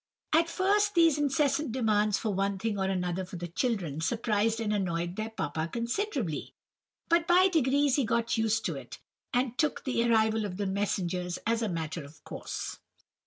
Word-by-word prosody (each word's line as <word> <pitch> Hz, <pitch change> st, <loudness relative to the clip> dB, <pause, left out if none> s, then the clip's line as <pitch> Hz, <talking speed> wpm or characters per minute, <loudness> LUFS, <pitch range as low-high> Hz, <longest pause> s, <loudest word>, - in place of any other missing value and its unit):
"At 330 Hz, +1 st, +4 dB
first 405 Hz, +3 st, +2 dB
these 330 Hz, -3 st, +5 dB
incessant 290 Hz, -1 st, +1 dB
demands 215 Hz, -4 st, +2 dB
for 215 Hz, -3 st, -2 dB
one 195 Hz, +1 st, 0 dB
thing 205 Hz, 0 st, -2 dB
or 190 Hz, -, +1 dB
another 185 Hz, -1 st, -1 dB
for 185 Hz, 0 st, -9 dB
the 175 Hz, 0 st, -4 dB
children, 175 Hz, -, -2 dB
surprised 225 Hz, +2 st, +1 dB
and 215 Hz, -2 st, 0 dB
annoyed 175 Hz, -3 st, -1 dB
their 215 Hz, +2 st, -3 dB
papa 160 Hz, -6 st, -3 dB
considerably, 255 Hz, -, -2 dB, 0.5 s
but 335 Hz, 0 st, +3 dB
by 365 Hz, +2 st, +6 dB
degrees 285 Hz, -4 st, +3 dB
he 280 Hz, -, +3 dB
got 230 Hz, +1 st, 0 dB
used 225 Hz, -1 st, +1 dB
to -, -, 0 dB
it, -, -, -8 dB, 0.3 s
and 250 Hz, -1 st, 0 dB
took 305 Hz, -2 st, +1 dB
the 250 Hz, -3 st, +1 dB
arrival 220 Hz, -1 st, +3 dB
of 190 Hz, -3 st, -4 dB
the 205 Hz, -, -1 dB
messengers 190 Hz, -3 st, -1 dB
as 230 Hz, +1 st, +1 dB
a 220 Hz, -, 0 dB
matter 165 Hz, -2 st, -3 dB
of 145 Hz, +2 st, -15 dB
course. -, -, -6 dB
220 Hz, 175 wpm, -29 LUFS, 190-270 Hz, 0.5 s, by